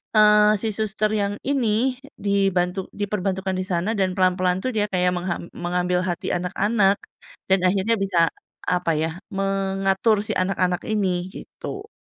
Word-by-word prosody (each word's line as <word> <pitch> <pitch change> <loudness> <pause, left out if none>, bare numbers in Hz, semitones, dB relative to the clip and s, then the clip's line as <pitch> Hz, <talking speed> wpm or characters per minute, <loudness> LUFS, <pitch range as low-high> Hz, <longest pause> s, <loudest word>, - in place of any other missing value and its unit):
eee, 210 0 +6
si 225 - -1
suster 215 0 0
yang 205 0 0
ini, 255 -2 +1 0.2
dibantu 195 -2 +1
diperbantukan 190 -2 -2
di 185 - -1
sana 185 +5 0
dan 190 -2 +1
pelan-pelan 185 -1 +2
tuh 255 - 0
dia 210 - +2
kayak 180 -1 +2
mengham 175 -1 -3
mengambil 180 +1 0
hati 175 -2 -3
anak-anak, 195 +3 +1 0.5
dan 190 0 +4
akhirnya 200 +5 +2
bisa, 175 -4 +2 0.4
apa 180 -2 +1
ya, 160 +1 -1 0.2
mengatur 195 +2 +1
si - - -2
anak-anak 185 -1 0
ini, 190 -4 -1
gitu. 400 - -8
195 Hz, 140 wpm, -23 LUFS, 180-210 Hz, 0.5 s, eee